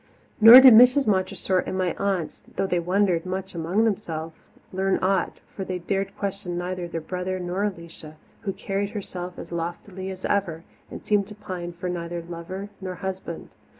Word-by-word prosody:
Nor 230 +4 +11
did 260 -2 +10
Mrs. 250 +5 +7
Montressor 190 -2 +1
and 185 - -3
my 185 -2 0
aunts, 195 -5 -2
though - - 0
they 180 -2 0
wondered 180 -1 +1
much 190 +1 -5
among 170 +6 0
themselves, 165 -7 -3 0.2
learn 190 +1 +1
aught, 190 -1 0
for 195 - -4
they 185 -1 -3
dared 195 +3 -3
question 195 -3 -4
neither 180 0 -3
their 165 -1 -4
brother 180 +3 -4
nor 180 +2 -2
Alicia, 170 -5 -7 0.3
who 200 - -2
carried 195 +1 -3
herself 180 -4 -6
as 170 - -9
loftily 175 +3 -5
as 190 -1 -7
ever, 170 -5 -1 0.3
and - - -9
seemed 205 -2 +2
to 210 - -10
pine 185 -4 -6
for 175 +1 -6
neither 170 -1 -4
lover 175 +4 -7
nor 185 -1 -5
husband. 185 -2 -6
185 Hz, 175 wpm, -25 LUFS, 175-200 Hz, 0.3 s, Nor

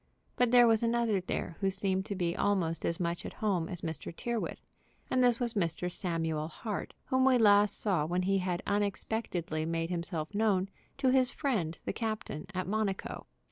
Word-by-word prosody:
But 245 -1 +3
there 245 0 +7
was 225 -2 +4
another 230 -4 +1
there 175 -2 -4
who 195 - +2
seemed 190 0 0
to 200 - -3
be 175 -2 -1
almost 175 -5 0
as 170 - -1
much 170 -1 -2
at - - -6
home 190 -6 0
as 180 -3 -6
Mr. 160 -1 -5
Tyrrwhit, 235 +6 -3 0.5
and 255 -1 +3
this 245 -2 +4
was 240 -2 0
Mr. 180 -2 -1
Samuel 165 -4 -2
Hart, 205 +5 -5
whom 260 0 +2
we 260 -1 +5
last 205 -2 +5
saw 180 -8 +1
when 180 +2 0
he 195 +1 +2
had 180 -1 -2
unexpectedly 200 -5 -1
made 165 +1 -2
himself 170 -1 -3
known 200 -3 +2 0.3
to 270 -1 +2
his 260 -1 +4
friend 210 - -1
the - - -2
captain 215 -9 -4
at 185 - -1
Monaco. 200 -1 -2
195 Hz, 180 wpm, -31 LUFS, 170-225 Hz, 0.5 s, there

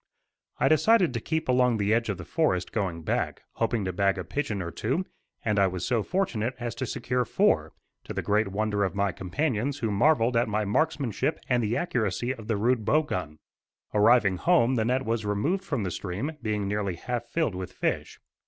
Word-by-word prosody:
I - - +3
decided 170 - +4
to 115 - -1
keep 160 +7 -2
along 125 -2 +3
the 105 +1 +1
edge 115 0 +1
of 100 - -1
the 90 - -8
forest 95 - 0
going 90 -6 -2
back, - - -2
hoping 115 -3 0
to 95 - -2
bag 100 +1 +2
a 90 - -3
pigeon 105 - -2
or 85 -2 -4
two; 135 - -1 0.4
and 105 -2 +2
I 100 - +5
was 90 -1 -3
so 120 -3 +1
fortunate 130 - -1
as 120 -1 -3
to 120 +2 -4
secure 125 0 -1
four, - - +2 0.3
to - - -6
the - - -2
great 105 +1 +2
wonder 105 +1 0
of 95 - -1
my 100 -1 +1
companions 120 - -1
who 115 -5 -1
marvelled 120 +2 +3
at 115 -1 +2
my 105 0 0
markmanship 135 0 0
and 125 -2 +2
the 110 +1 0
accuracy 120 - -1
of 110 -5 -11
the 110 - 0
rude 115 +2 +1
bow 155 +9 +3
gun. 90 - -4 0.6
Arriving 105 -2 +4
home 130 - +3
the 110 -3 +1
net 130 +3 0
was 115 -1 -1
removed 125 - 0
from 145 - -2
the 90 - -2
stream, 100 - -3
being 105 -2 -1
nearly 100 -2 -1
half 120 +6 -4
filled 160 - 0
with 90 0 -5
fish. - - -2
115 Hz, 205 wpm, -27 LUFS, 100-130 Hz, 0.6 s, I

